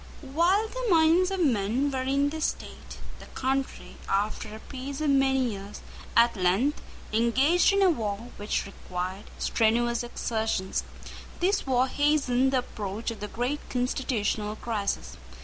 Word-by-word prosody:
While 370 Hz, +7 st, +3 dB
the -, -, -4 dB
minds 335 Hz, +1 st, +5 dB
of 385 Hz, -1 st, -2 dB
men 240 Hz, +3 st, +1 dB
were 260 Hz, -1 st, -1 dB
in 275 Hz, +2 st, +1 dB
this 315 Hz, +1 st, -2 dB
state, -, -, -6 dB, 0.2 s
the -, -, -12 dB
country, 265 Hz, +1 st, -2 dB
after 210 Hz, +2 st, -1 dB
a -, -, -9 dB
peace 270 Hz, +3 st, -7 dB
of 305 Hz, -2 st, +2 dB
many 265 Hz, -2 st, +3 dB
years, 200 Hz, 0 st, -8 dB, 0.4 s
at 235 Hz, 0 st, +5 dB
length 195 Hz, +10 st, +1 dB, 0.3 s
engaged 260 Hz, -, +4 dB
in 395 Hz, 0 st, +3 dB
a 380 Hz, -, +6 dB
war 220 Hz, -4 st, -3 dB
which 205 Hz, +1 st, -1 dB
required 185 Hz, 0 st, -5 dB
strenuous 235 Hz, +1 st, +1 dB
exertions. 220 Hz, -5 st, -2 dB, 0.6 s
This 385 Hz, -2 st, +1 dB
war 255 Hz, 0 st, +3 dB
hastened 270 Hz, -3 st, +2 dB
the 265 Hz, -, +2 dB
approach 210 Hz, +3 st, -4 dB
of 230 Hz, -, -8 dB
the 210 Hz, -, -4 dB
great 245 Hz, +7 st, -2 dB
constitutional 230 Hz, -4 st, -1 dB
crisis. 200 Hz, -, -3 dB
250 Hz, 145 wpm, -27 LUFS, 215-285 Hz, 0.6 s, a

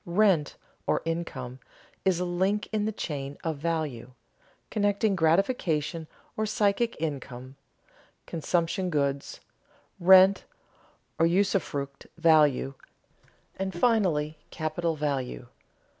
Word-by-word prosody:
Rent, 175 Hz, -4 st, +2 dB, 0.3 s
or -, -, +1 dB
income, 135 Hz, -7 st, -4 dB, 0.5 s
is 185 Hz, -2 st, +3 dB
a 180 Hz, -, 0 dB
link 190 Hz, +4 st, 0 dB
in 215 Hz, -1 st, 0 dB
the 220 Hz, -, 0 dB
chain 145 Hz, -7 st, -5 dB
of 160 Hz, -3 st, -2 dB
value, 150 Hz, -6 st, -3 dB, 0.6 s
connecting 205 Hz, -1 st, +1 dB
gratification 165 Hz, -, +1 dB, 0.3 s
or 215 Hz, 0 st, -1 dB
psychic 215 Hz, +1 st, +1 dB
income, 135 Hz, -4 st, -5 dB, 0.7 s
consumption 175 Hz, +3 st, -1 dB
goods, 140 Hz, -3 st, -1 dB, 0.6 s
rent 190 Hz, +2 st, +7 dB, 0.8 s
or 165 Hz, -, +5 dB
usufruct 170 Hz, -7 st, -1 dB
value, 150 Hz, -5 st, +4 dB, 0.8 s
and 190 Hz, -1 st, -3 dB
finally 170 Hz, -10 st, +2 dB
capital 160 Hz, +1 st, -2 dB
value. 135 Hz, -5 st, -3 dB
165 Hz, 100 wpm, -27 LUFS, 145-190 Hz, 0.8 s, rent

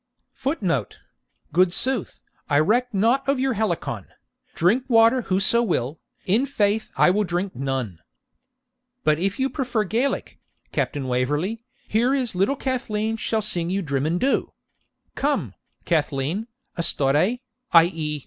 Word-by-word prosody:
[Footnote: 185 Hz, -, -2 dB, 0.6 s
Good 180 Hz, +1 st, +4 dB
sooth, 255 Hz, +2 st, -1 dB, 0.3 s
I 145 Hz, -, +3 dB
reck 240 Hz, +11 st, +2 dB
nought 235 Hz, +7 st, +1 dB
of 275 Hz, -2 st, +2 dB
your 265 Hz, 0 st, +1 dB
Helicon; 175 Hz, -, -2 dB, 0.5 s
Drink 210 Hz, +10 st, +2 dB
water 230 Hz, +1 st, +5 dB
whoso 195 Hz, +3 st, +3 dB
will, 160 Hz, -, -1 dB, 0.3 s
in 225 Hz, +9 st, +2 dB
faith 215 Hz, -4 st, 0 dB
I -, -, +5 dB
will 210 Hz, +3 st, +1 dB
drink 180 Hz, +1 st, -2 dB
none.] 130 Hz, -9 st, -3 dB, 1.0 s
But 155 Hz, 0 st, +2 dB
if 195 Hz, +4 st, -1 dB
you 265 Hz, -, +2 dB
prefer 250 Hz, -6 st, -1 dB
the 190 Hz, -, -10 dB
Gaelic, 250 Hz, +5 st, -1 dB, 0.3 s
Captain 140 Hz, -2 st, -2 dB
Waverley, 145 Hz, -, -1 dB, 0.2 s
here 240 Hz, +5 st, +2 dB
is 255 Hz, -5 st, -1 dB
little 195 Hz, +9 st, +1 dB
Cathleen 225 Hz, -5 st, -2 dB
shall 220 Hz, 0 st, -1 dB
sing 175 Hz, -5 st, 0 dB
you 195 Hz, +1 st, -1 dB
Drimmindhu. 155 Hz, -, 0 dB, 0.7 s
Come, 265 Hz, -, -1 dB, 0.3 s
Cathleen, 155 Hz, -, -1 dB, 0.3 s
astore 155 Hz, -, +2 dB, 0.4 s
(i.e. 165 Hz, -3 st, +3 dB
195 Hz, 130 wpm, -23 LUFS, 155-235 Hz, 1.0 s, water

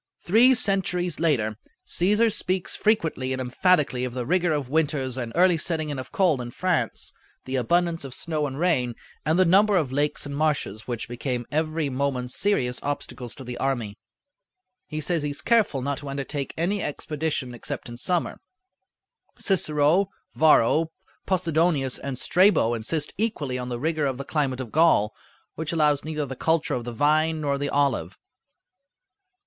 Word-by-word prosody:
Three 240 Hz, +8 st, +5 dB
centuries 180 Hz, -7 st, +1 dB
later, 115 Hz, -10 st, +1 dB, 0.3 s
C�sar 210 Hz, -, +2 dB
speaks 185 Hz, 0 st, -1 dB
frequently 160 Hz, -11 st, +1 dB
and 130 Hz, -, -3 dB
emphatically 130 Hz, 0 st, +2 dB
of 125 Hz, -1 st, -4 dB
the 125 Hz, -1 st, -3 dB
rigor 175 Hz, +2 st, +2 dB
of 145 Hz, -4 st, -1 dB
winters 140 Hz, -3 st, 0 dB
and 120 Hz, -3 st, -4 dB
early 180 Hz, 0 st, +4 dB
setting 160 Hz, -2 st, -2 dB
in 145 Hz, -2 st, -3 dB
of 130 Hz, -, -8 dB
cold 185 Hz, -, +2 dB
in 120 Hz, -, -6 dB
France, 155 Hz, -, -1 dB, 0.3 s
the 130 Hz, -, -3 dB
abundance 170 Hz, +6 st, +1 dB
of 135 Hz, -3 st, -5 dB
snow 155 Hz, -3 st, -1 dB
and 135 Hz, -1 st, -6 dB
rain, 130 Hz, -9 st, +1 dB, 0.3 s
and 160 Hz, +2 st, +3 dB
the 185 Hz, -, +5 dB
number 200 Hz, +4 st, +4 dB
of 150 Hz, -7 st, 0 dB
lakes 145 Hz, +2 st, 0 dB
and 140 Hz, 0 st, -5 dB
marshes 145 Hz, -8 st, -1 dB
which 120 Hz, -2 st, -4 dB
became 120 Hz, 0 st, -3 dB
every 155 Hz, 0 st, 0 dB
moment 130 Hz, -2 st, -2 dB
serious 130 Hz, -12 st, 0 dB
obstacles 130 Hz, -4 st, -4 dB
to 135 Hz, -, -9 dB
the 125 Hz, -1 st, -6 dB
army. 120 Hz, -7 st, -1 dB, 0.9 s
He 155 Hz, -1 st, -4 dB
says 170 Hz, +1 st, 0 dB
he 145 Hz, -, -2 dB
is 145 Hz, -, -3 dB
careful 215 Hz, -, +2 dB
not 140 Hz, 0 st, -2 dB
to 145 Hz, -, -7 dB
undertake 140 Hz, 0 st, -3 dB
any 190 Hz, +5 st, 0 dB
expedition 150 Hz, -3 st, -3 dB
except 130 Hz, +3 st, -5 dB
in 120 Hz, -, -8 dB
summer. 175 Hz, +8 st, -1 dB, 1.0 s
Cicero, 165 Hz, +1 st, +2 dB, 0.2 s
Varro, 155 Hz, +1 st, +4 dB, 0.4 s
Possidonius, 165 Hz, -7 st, +1 dB
and 140 Hz, -2 st, -5 dB
Strabo 180 Hz, -, +3 dB
insist 145 Hz, +7 st, -2 dB
equally 150 Hz, -, -1 dB
on 125 Hz, 0 st, -5 dB
the 120 Hz, -1 st, -3 dB
rigor 155 Hz, +1 st, 0 dB
of 130 Hz, -2 st, -2 dB
the 140 Hz, -, -6 dB
climate 135 Hz, -5 st, -1 dB
of 120 Hz, -4 st, -7 dB
Gaul, 155 Hz, -10 st, +4 dB, 0.4 s
which 160 Hz, 0 st, -4 dB
allows 150 Hz, -3 st, +2 dB
neither 155 Hz, -1 st, -3 dB
the 135 Hz, -1 st, -6 dB
culture 160 Hz, +3 st, +1 dB
of 120 Hz, -2 st, -3 dB
the 120 Hz, -, -4 dB
vine 155 Hz, +5 st, +2 dB
nor 140 Hz, -2 st, 0 dB
the 145 Hz, 0 st, -1 dB
olive. 130 Hz, -, 0 dB
150 Hz, 165 wpm, -25 LUFS, 130-170 Hz, 1.0 s, Three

